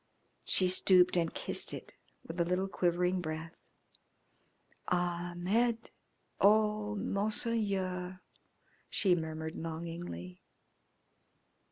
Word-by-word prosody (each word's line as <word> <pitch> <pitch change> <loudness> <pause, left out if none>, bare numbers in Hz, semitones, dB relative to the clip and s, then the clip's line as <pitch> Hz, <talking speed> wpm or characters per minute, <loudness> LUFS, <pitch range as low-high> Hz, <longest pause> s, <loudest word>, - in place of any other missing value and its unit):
She 185 - +3
stooped 180 0 +5
and 165 -2 +1
kissed - - 0
it - - -10 0.3
with 165 +2 -7
a - - +4
little 180 +3 0
quivering 180 0 +1
breath. 160 0 -5 1.3
"Ahmed. 180 +7 0 0.5
Oh, 210 0 +3
Monseigneur!" 200 -3 -1 0.7
she 190 -3 +3
murmured 160 -1 -3
longingly. 165 - -6
180 Hz, 80 wpm, -32 LUFS, 170-200 Hz, 1.3 s, stooped